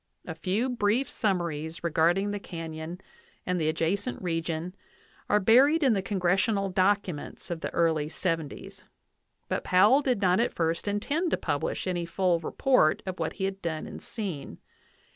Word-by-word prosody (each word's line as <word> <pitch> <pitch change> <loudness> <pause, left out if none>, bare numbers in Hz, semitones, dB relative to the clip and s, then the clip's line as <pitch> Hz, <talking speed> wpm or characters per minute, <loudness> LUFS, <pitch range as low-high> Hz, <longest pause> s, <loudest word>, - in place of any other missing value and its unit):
A 165 - -5
few 190 +9 -1
brief 245 +1 +1
summaries 170 -8 -2
regarding 170 +5 +2
the 205 - -3
canyon 165 -1 -7 0.4
and 180 -1 0
the 155 - +2
adjacent 185 +9 -1
region 165 0 -3 0.6
are 210 - +4
buried 270 - +5
in 260 -4 +5
the 195 - 0
congressional 195 +1 +1
documents 185 -4 -1
of 165 -1 -4
the - - -2
early 160 -3 +1
'705; 165 -4 -4 0.6
but - - -2
Powell 205 +10 +5
did 255 -6 0
not 185 -1 +3
at 235 - 0
first 165 +3 -1
intend 285 - 0
to - - +1
publish 145 -3 -2
any 175 -2 -2
full 175 0 +1
report 165 0 +2
of 185 -1 -5
what 160 - -1
he 195 - -5
had 195 0 -2
done 160 -3 -3
and - - -9
seen. 190 -11 -5
185 Hz, 160 wpm, -28 LUFS, 165-205 Hz, 0.6 s, buried